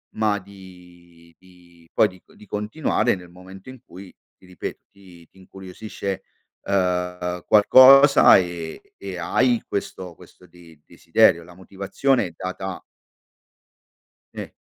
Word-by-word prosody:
ma 105 Hz, -2 st, 0 dB
di 90 Hz, -3 st, -18 dB
di 85 Hz, -2 st, -23 dB
poi 110 Hz, -, +4 dB
di 95 Hz, -2 st, -16 dB
co -, -, -25 dB
di -, -, -17 dB
continuare 105 Hz, +3 st, -1 dB
nel 90 Hz, -2 st, -12 dB
momento 95 Hz, +3 st, -15 dB
in 130 Hz, -2 st, -12 dB
cui 95 Hz, +2 st, -14 dB, 0.2 s
ti -, -, -22 dB
ripeto, 90 Hz, -1 st, -8 dB
ti 90 Hz, -4 st, -18 dB
ti -, -, -28 dB
incuriosisce, 95 Hz, +1 st, -8 dB, 0.4 s
uhm, 90 Hz, -2 st, -2 dB
qualcosa 135 Hz, +6 st, +7 dB
e 85 Hz, -3 st, -6 dB
e 95 Hz, -2 st, -8 dB
hai 120 Hz, +7 st, 0 dB
questo 90 Hz, -3 st, -6 dB
questo 90 Hz, -, -19 dB
de 85 Hz, -2 st, -19 dB
desiderio. 85 Hz, -, +2 dB
La 90 Hz, +1 st, -16 dB
motivazione 100 Hz, +7 st, -2 dB
è 85 Hz, -, -14 dB
data 95 Hz, +1 st, -7 dB, 1.5 s
Sì. -, -, -8 dB
95 Hz, 125 wpm, -22 LUFS, 90-100 Hz, 1.5 s, qualcosa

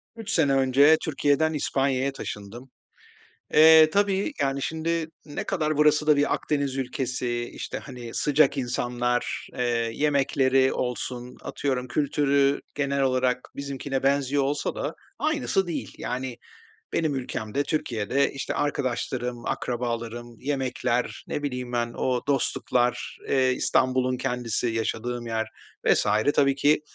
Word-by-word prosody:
3 225 Hz, -1 st, -5 dB
sene 145 Hz, -5 st, +3 dB
önce 135 Hz, +4 st, +5 dB
Türkiye'den 155 Hz, +1 st, +2 dB
İspanya'ya 135 Hz, -2 st, 0 dB
taşındım. 120 Hz, 0 st, -8 dB, 0.8 s
Eee, 160 Hz, 0 st, +8 dB
tabii, 200 Hz, -, +1 dB
yani, 135 Hz, 0 st, 0 dB
şimdi 160 Hz, +2 st, -1 dB, 0.2 s
ne 145 Hz, -2 st, -5 dB
kadar 155 Hz, -5 st, -1 dB
burası 150 Hz, 0 st, +4 dB
da 150 Hz, -, +6 dB
bir 145 Hz, -, +2 dB
Akdeniz 140 Hz, -3 st, -1 dB
ülkesi, 125 Hz, -2 st, -2 dB
işte, -, -, -5 dB
hani, 125 Hz, -4 st, -9 dB
sıcak 145 Hz, -1 st, +3 dB
insanlar, 120 Hz, -1 st, -1 dB
eee, 125 Hz, -, 0 dB, 0.3 s
yemekleri 135 Hz, -2 st, +2 dB
olsun, 125 Hz, 0 st, -4 dB
atıyorum 130 Hz, -3 st, -2 dB
kültürü 140 Hz, 0 st, +2 dB, 0.2 s
genel 140 Hz, -1 st, 0 dB
olarak 130 Hz, -1 st, +2 dB, 0.2 s
bizimkine 140 Hz, -1 st, -3 dB
benziyor 140 Hz, 0 st, +2 dB
olsa 140 Hz, +2 st, -1 dB
da -, -, -3 dB, 0.2 s
aynısı 290 Hz, -, +1 dB
değil. 170 Hz, -, -4 dB
Yani, 125 Hz, 0 st, -4 dB, 0.6 s
benim 155 Hz, -3 st, +1 dB
ülkemde, 125 Hz, -1 st, -2 dB
Türkiye'de, 135 Hz, -3 st, 0 dB
işte, 135 Hz, -, -4 dB
arkadaşlarım, 125 Hz, -3 st, -2 dB
akrabalarım, 120 Hz, -1 st, -3 dB
yemekler, 130 Hz, -3 st, -1 dB
ne 145 Hz, -, -3 dB
bileyim 125 Hz, -3 st, -4 dB
ben 120 Hz, -1 st, -1 dB
o 125 Hz, -1 st, 0 dB
dostluklar, 125 Hz, -2 st, 0 dB
eee, 130 Hz, -1 st, +3 dB
İstanbul'un 130 Hz, 0 st, +1 dB
kendisi, 125 Hz, -3 st, -2 dB
yaşadığım 115 Hz, +2 st, -2 dB
yer 110 Hz, -1 st, -1 dB, 0.4 s
vs. -, -, +3 dB, 0.3 s
tabii 140 Hz, -1 st, +4 dB
ki, 145 Hz, +3 st, +3 dB
135 Hz, 120 wpm, -26 LUFS, 125-145 Hz, 0.8 s, Eee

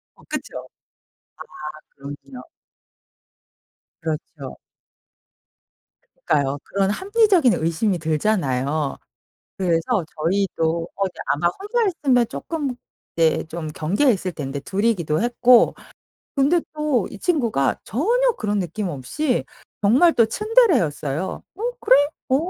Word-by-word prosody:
어 -, -, -21 dB
그쵸. -, -, -5 dB, 1.1 s
아 -, -, -16 dB
그렇군요. 140 Hz, -2 st, -9 dB, 1.6 s
그렇죠. 155 Hz, -3 st, -5 dB, 1.7 s
그러니까요 140 Hz, -1 st, +1 dB
그런 195 Hz, -1 st, 0 dB
합리적인 385 Hz, -, +3 dB
의심이 175 Hz, +4 st, 0 dB
들잖아요 150 Hz, -4 st, 0 dB, 0.6 s
그래서 180 Hz, +3 st, +1 dB
저희도 165 Hz, -1 st, 0 dB
거기 195 Hz, -1 st, -1 dB, 0.2 s
아마 155 Hz, +4 st, +2 dB
혼자였으면 360 Hz, -, +1 dB
조금 290 Hz, -6 st, -4 dB, 0.4 s
네 160 Hz, -1 st, +2 dB
좀 160 Hz, -1 st, -5 dB
경계했을 185 Hz, -, +1 dB
텐데 140 Hz, -3 st, -5 dB
2 195 Hz, +8 st, -3 dB
이기도 170 Hz, -9 st, +1 dB
했고 245 Hz, 0 st, +5 dB, 0.6 s
근데 295 Hz, +6 st, +3 dB
또 295 Hz, -10 st, 0 dB
이 205 Hz, -, -9 dB
친구가 230 Hz, -, 0 dB
전혀 475 Hz, -, +2 dB
그런 210 Hz, -2 st, -1 dB
느낌 190 Hz, +3 st, -3 dB
없이 175 Hz, -, -2 dB, 0.4 s
정말 260 Hz, +12 st, +5 dB
또 230 Hz, -, +5 dB
츤데레였어요. 220 Hz, -, +1 dB
"어 410 Hz, -, -9 dB, 0.2 s
그래. 260 Hz, -, +6 dB, 0.3 s
어 260 Hz, -, +4 dB
195 Hz, 230 characters per minute, -22 LUFS, -, 1.7 s, 그래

